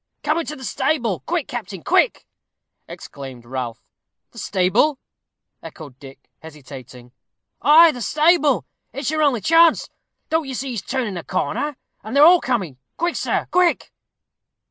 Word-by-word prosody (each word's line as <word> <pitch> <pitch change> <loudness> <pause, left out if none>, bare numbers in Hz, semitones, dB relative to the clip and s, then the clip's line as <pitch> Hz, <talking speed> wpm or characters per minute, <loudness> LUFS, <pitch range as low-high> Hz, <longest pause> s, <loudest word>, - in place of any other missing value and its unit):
"Come 305 +2 +1
into 305 -2 -5
the 265 - -12
stable. 260 - -1
Quick, 335 -4 -1
captain, 205 -8 -7
quick!" - - +1 0.6
exclaimed 130 -4 -10
Ralph. 125 -2 -6 0.5
"The - - -12
stable!" 195 +10 +1 0.6
echoed 145 -6 -12
Dick, 135 -1 -14
hesitating. 130 -5 -12 0.5
"Ay, 320 +2 +7
the 245 - -8
stable; 305 - +2 0.3
it's 275 +4 -3
your 310 0 -1
only 275 -7 +2
chance. 330 - +4 0.4
Don't 320 -2 0
you 265 - -5
see 270 +2 -4
he's 230 -5 -4
turning 245 -5 -3
the 175 -3 -6
corner, 290 - -3 0.3
and 220 +5 -6
they - - +4
are 295 - +8
all 355 +1 +6
coming? 190 - -3 0.2
Quick, 345 +1 -1
sir, - - -2
quick!" 360 -1 +1
250 Hz, 145 wpm, -20 LUFS, -, 0.6 s, are